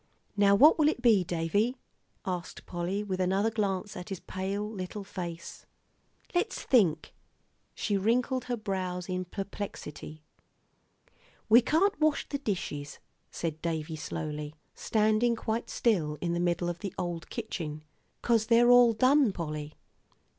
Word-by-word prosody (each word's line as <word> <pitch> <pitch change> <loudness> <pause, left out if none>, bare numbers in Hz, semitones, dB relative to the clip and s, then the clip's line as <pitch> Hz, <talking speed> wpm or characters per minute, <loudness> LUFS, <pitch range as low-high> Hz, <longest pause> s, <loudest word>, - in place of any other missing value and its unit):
"Now 200 -1 +5
what 300 +9 +7
will 300 - +5
it - - -3
be, 220 -6 +5
Davie?" 185 +8 0 0.5
asked 180 -1 -5
Polly, 180 +4 -2
with 190 -3 -3
another 195 +4 +1
glance 205 -2 -2
at 180 +3 -7
his 195 -3 -4
pale 195 +2 -3
little 205 -1 -6
face. 175 -4 -7 0.7
"Let's 380 +6 -1
think," 175 - +2 0.6
she 205 -2 0
wrinkled 245 +5 +1
her 245 -1 -2
brows 185 -4 -3
in 185 -1 -2
perplexity. 180 -5 -7 1.3
"We 230 +3 +8
can't 365 - +2
wash 305 -1 +2
the 280 - -3
dishes," 150 - -4 0.3
said 160 -2 -4
Davie, 160 -1 -3
slowly, 150 0 -5 0.2
standing 220 +2 +2
quite 225 +1 -3
still 160 -10 +1
in 170 +1 -1
the 175 - -1
middle 175 0 0
of 175 -1 -3
the 200 -3 -6
old 175 -1 -4
kitchen, 160 -10 -5 0.4
"'cause 225 -2 +2
they're 240 +1 +6
all 245 -1 +7
done, 260 +1 +4
Polly." 155 -4 -5
195 Hz, 140 wpm, -29 LUFS, 170-230 Hz, 1.3 s, We